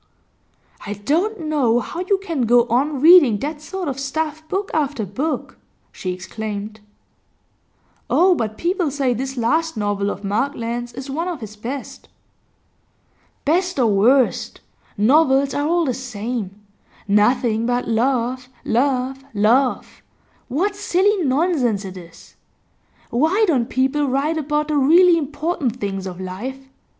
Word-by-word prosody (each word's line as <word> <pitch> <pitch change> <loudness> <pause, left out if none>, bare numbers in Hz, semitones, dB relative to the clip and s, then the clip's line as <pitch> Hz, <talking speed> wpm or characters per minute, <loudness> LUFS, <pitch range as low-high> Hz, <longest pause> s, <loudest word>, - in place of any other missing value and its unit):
'I 205 - -3
don't 370 - 0
know 285 -7 +1
how 330 - -6
you 375 +2 +1
can 330 - -2
go 240 +1 +5
on 275 +3 0
reading 310 - +7
that 295 +6 -5
sort 370 +2 -5
of 275 -1 -3
stuff, 310 +3 -3
book 395 +1 -2
after 285 -7 -1
book,' 270 - -4 0.3
she 185 - -4
exclaimed. 210 +3 -6 1.3
'Oh, 365 +2 +5
but 220 -8 -3
people 350 -2 0
say 270 -3 0
this 265 +3 -4
last 315 +5 0
novel 205 -1 -1
of 200 - -6
Markland's 235 +2 -2
is 265 +1 -7
one 330 +5 -2
of 345 -5 -4
his 215 -2 -9
best.' 245 +6 -7 1.4
'Best 360 +4 +1
or 255 - +3
worst, 245 +6 +2 0.4
novels 270 +4 +3
are 290 +1 0
all 340 +1 +2
the 260 - 0
same. 230 -5 -5 0.5
Nothing 220 +2 +2
but 245 0 -1
love, 250 +2 0 0.2
love, 265 +2 0
love; 240 +6 +1 0.5
what 370 +11 -1
silly 400 0 +1
nonsense 260 - +1
it 190 -1 -8
is! 170 -2 -14 0.8
Why 325 - +2
don't 260 -7 +1
people 270 +3 +1
write 285 +5 0
about 300 +1 -1
the 300 - +1
really 340 +6 +6
important 290 -4 -2
things 195 -2 -3
of 180 -1 -7
life? 245 +9 -6
265 Hz, 135 wpm, -20 LUFS, 230-315 Hz, 1.4 s, reading